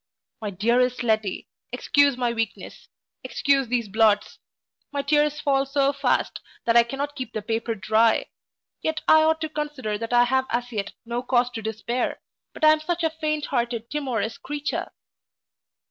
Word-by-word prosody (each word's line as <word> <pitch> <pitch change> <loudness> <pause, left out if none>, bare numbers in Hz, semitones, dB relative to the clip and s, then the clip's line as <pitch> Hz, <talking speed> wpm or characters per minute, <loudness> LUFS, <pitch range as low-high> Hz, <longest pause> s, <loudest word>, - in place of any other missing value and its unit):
My 210 - -3
dearest 240 +6 +1
Letty, 215 -4 0 0.2
excuse 280 +2 +3
my 240 -2 0
weakness 225 -3 -5 0.4
excuse 275 -2 +1
these 235 -2 -1
blots 210 0 +2 0.5
my 285 -1 -2
tears 295 +1 +2
fall 275 -2 +2
so 275 0 +1
fast 275 -3 0 0.3
that 230 - +2
I 235 - +9
cannot 275 +5 -4
keep 255 -5 -6
the 215 - -4
paper 225 +1 -2
dry 220 +3 +3 0.6
yet 315 0 -2
I 315 - +7
ought 320 0 +3
to 315 - -2
consider 295 -9 -3
that 230 +1 -5
I 240 0 +6
have 260 +2 +1
as 245 +1 -2
yet 205 -3 -3
no 235 +1 -2
cause 245 -1 +1
to 225 - -5
despair 220 +3 -2 0.3
but - - -11
I 310 - +8
am 310 - +3
such 340 +2 -2
a 320 - +2
faint 305 -2 -2
hearted 235 -3 -2
timorous 240 -7 -2
creature! 295 +1 -3
250 Hz, 165 wpm, -24 LUFS, 225-290 Hz, 0.6 s, I